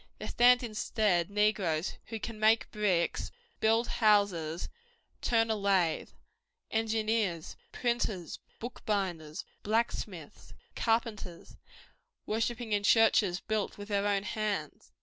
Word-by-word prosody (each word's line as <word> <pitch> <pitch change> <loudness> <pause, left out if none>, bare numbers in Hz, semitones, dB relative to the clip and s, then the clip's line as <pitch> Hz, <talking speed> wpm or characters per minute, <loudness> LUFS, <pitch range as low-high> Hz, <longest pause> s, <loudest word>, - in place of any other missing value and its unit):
There - - -6
stand 245 +1 +5
instead 215 -5 0
negroes 200 -6 +1
who 225 -1 -5
cap 230 +1 -5
make 220 +1 +3
bricks, 190 -5 0 0.3
build 225 +2 +3
houses, 200 -7 +2 0.5
turn 225 -1 +2
a - - +1
lathe; 195 -5 +1 0.6
engineers, 220 -6 0 0.2
printers, 225 -8 -2 0.2
bookbinders, 190 -10 -3 0.2
blacksmiths, 225 +3 -3 0.2
carpenters, 225 -6 -2 0.7
worshipping 225 +1 -2
in 205 -1 +2
churches 205 -3 +4
built 215 -2 -2
with 205 +1 -9
their 200 0 +1
own 200 -1 +1
hands. 205 -8 -3
210 Hz, 105 wpm, -31 LUFS, 190-225 Hz, 0.7 s, stand